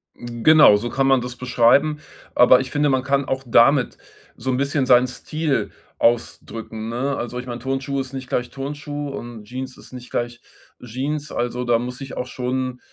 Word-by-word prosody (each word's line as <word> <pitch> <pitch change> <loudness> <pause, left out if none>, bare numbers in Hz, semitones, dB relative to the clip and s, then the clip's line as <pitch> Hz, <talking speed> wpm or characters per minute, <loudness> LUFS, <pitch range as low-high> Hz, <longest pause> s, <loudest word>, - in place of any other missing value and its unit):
Genau, 120 +2 +5
so 120 +4 -4
kann 135 +2 +1
man 135 -2 +4
das 125 0 -6
beschreiben, 130 +5 +3 0.4
aber 125 +1 +7
ich 130 - -4
finde, 145 0 +2
man 130 -1 +1
kann 140 +1 +1
auch 130 0 -2
damit 125 +3 +4 0.4
so 130 +3 -5
‘n 125 - +1
bisschen 140 0 0
seinen 125 0 +5
Stil 155 +3 -2 0.3
ausdrücken, 115 -1 -1
ne? 130 +4 -1
Also 120 +1 -4
ich 125 - -7
meine, 120 -1 -6
Turnschuh 135 +2 -2
ist 130 0 -5
nicht 130 -1 -6
gleich 125 0 -1
Turnschuh 145 +1 -5
und 120 -5 -8
Jeans 130 +4 -7
ist - - -15
nicht 125 -1 -9
gleich 120 0 -3 0.4
Jeans. 140 +5 -4
Also 120 +1 -2
da 120 -1 +3
muss 125 +2 -5
ich 135 -2 -7
auch - - -3
schon 125 0 -3
130 Hz, 185 wpm, -22 LUFS, 120-135 Hz, 0.4 s, aber